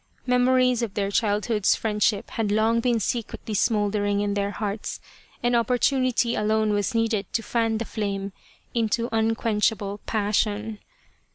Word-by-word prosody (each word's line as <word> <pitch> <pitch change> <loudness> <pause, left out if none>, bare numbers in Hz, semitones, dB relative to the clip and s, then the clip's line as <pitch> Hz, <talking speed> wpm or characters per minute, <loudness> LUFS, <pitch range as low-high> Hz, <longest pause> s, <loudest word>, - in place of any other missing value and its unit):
Memories 250 0 +3
of 220 -4 -3
their 200 -1 -1
childhood's 210 0 +1
friendship 210 -2 0
had 215 -3 -1
long 220 +2 +2
been 235 -1 +1
secretly 220 0 -3
smouldering 205 -1 +1
in 205 0 0
their 200 0 -1
hearts, 205 0 -4 0.4
and 240 0 +2
oppor 235 +1 +2
tunity 255 -2 +1
alone 215 0 +1
was 205 +3 -1
needed 225 -3 0
to 225 - 0
fan 225 -1 0
the 230 - -3
flame 200 -3 -3 0.4
into 230 0 0
un 225 0 +1
quenchable 210 -2 0
passion. 210 0 0
220 Hz, 145 wpm, -25 LUFS, 205-230 Hz, 0.4 s, Memories